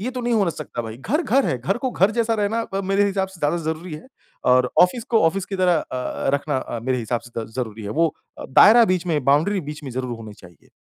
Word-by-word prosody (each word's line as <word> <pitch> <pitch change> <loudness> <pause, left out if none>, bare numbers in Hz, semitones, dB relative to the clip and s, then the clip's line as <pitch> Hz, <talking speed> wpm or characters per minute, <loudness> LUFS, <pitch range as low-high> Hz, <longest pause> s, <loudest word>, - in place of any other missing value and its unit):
ये 235 +5 -3
तो 255 - -4
नहीं 240 0 0
हो 200 -5 +2
सकता 145 -6 -6
भाई 110 0 -7
घर, 250 - -1
घर 275 -4 +2
है। 130 - 0
घर 195 - -1
को 260 0 -2
घर 195 -1 +2
जैसा 230 0 +1
रहना 215 +2 0
अ, 195 -3 -4
मेरे 195 +1 +2
हिसाब 190 -1 -1
से 190 - -15
ज़्यादा 150 +4 +1
ज़रूरी 160 +1 -4
है 150 - -10 0.5
और 125 0 +3
ऑफ़िस 220 +6 +1
को 225 - +4
ऑफ़िस 190 +3 0
की 195 - -4
तरह 180 -2 +3
अ 130 - -6
अ, 125 - -2
रखना 140 0 -1
अ, 120 -2 -5
मेरे 130 +2 -1
हिसाब 120 0 -2
से 120 -1 -7
द 110 - -6
ज़रूरी 110 -3 -4
है। 100 - -5
वो 165 - +4 0.3
अ, - - -7
दायरा 225 - +7
बीच 185 -3 0
में 155 -4 0
बाउंड्री 160 +9 +2
बीच 150 - -9
में 135 - -6
ज़रूर 125 -1 -4
होनी 110 -2 -10
चाहिए। 90 -6 -18
165 Hz, 265 wpm, -22 LUFS, 125-200 Hz, 0.5 s, दायरा